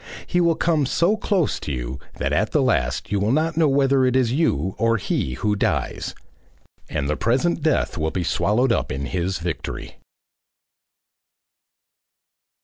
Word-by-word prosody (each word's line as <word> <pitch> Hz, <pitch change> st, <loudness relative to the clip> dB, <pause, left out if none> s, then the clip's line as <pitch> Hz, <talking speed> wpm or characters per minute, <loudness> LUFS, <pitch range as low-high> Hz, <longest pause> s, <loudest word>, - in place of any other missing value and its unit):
He 175 Hz, -, +1 dB
will 170 Hz, -1 st, +3 dB
come 155 Hz, -5 st, +1 dB
so 170 Hz, +9 st, +2 dB
close 195 Hz, -7 st, 0 dB
to -, -, -5 dB
you 65 Hz, 0 st, -4 dB, 0.2 s
that -, -, -2 dB
at -, -, 0 dB
the -, -, +3 dB
last -, -, 0 dB
you 100 Hz, -, +1 dB
will 105 Hz, +3 st, +1 dB
not 160 Hz, +4 st, +1 dB
know 160 Hz, -1 st, +3 dB
whether 135 Hz, -1 st, +3 dB
it 130 Hz, 0 st, +2 dB
is 125 Hz, -3 st, +2 dB
you 95 Hz, -, +1 dB
or 115 Hz, 0 st, +3 dB
he 65 Hz, -, -2 dB
who 105 Hz, -, 0 dB
dies, 100 Hz, -, -1 dB, 0.7 s
and 75 Hz, -3 st, -2 dB
the 75 Hz, -, 0 dB
present 135 Hz, -, +1 dB
death 155 Hz, -, 0 dB
will 80 Hz, +1 st, 0 dB
be 90 Hz, +2 st, -2 dB
swallowed 115 Hz, +9 st, +1 dB
up -, -, 0 dB
in 70 Hz, +1 st, -3 dB
his 90 Hz, +3 st, -2 dB
victory. 85 Hz, 0 st, -5 dB
115 Hz, 160 wpm, -22 LUFS, -, 0.7 s, will